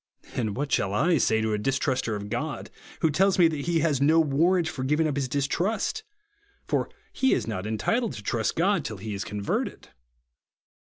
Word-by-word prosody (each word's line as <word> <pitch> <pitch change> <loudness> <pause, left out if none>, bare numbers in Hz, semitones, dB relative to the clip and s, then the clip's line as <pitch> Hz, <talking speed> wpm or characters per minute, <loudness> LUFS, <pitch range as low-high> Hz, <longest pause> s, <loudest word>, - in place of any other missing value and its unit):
And 110 -5 -2
what 140 0 -2
shall 100 0 +1
I 165 +7 +3
say 110 -2 +2
to 110 0 0
a 105 - 0
distruster 130 -1 0
of 105 0 -6
God, 140 +4 -4 0.3
who 160 - +3
tells 190 +5 +3
me 175 -2 +6
that 150 -3 -4
he 170 -2 +2
has 145 -4 +1
no 155 +3 +5
warrant 165 +4 +2
for 130 -4 -4
giving 150 +4 +2
up 145 - -2
his 140 -2 -1
distrust, 180 - -1 0.6
for - - 0 0.2
he 265 - +3
is - - -2
not 105 -3 -4
entitled 225 - 0
to 105 -4 -8
trust 110 +2 -1
God 185 0 +2
till 110 - -5
he 110 +2 -5
is 100 0 -3
converted 100 0 -3
140 Hz, 195 wpm, -26 LUFS, 110-165 Hz, 0.6 s, me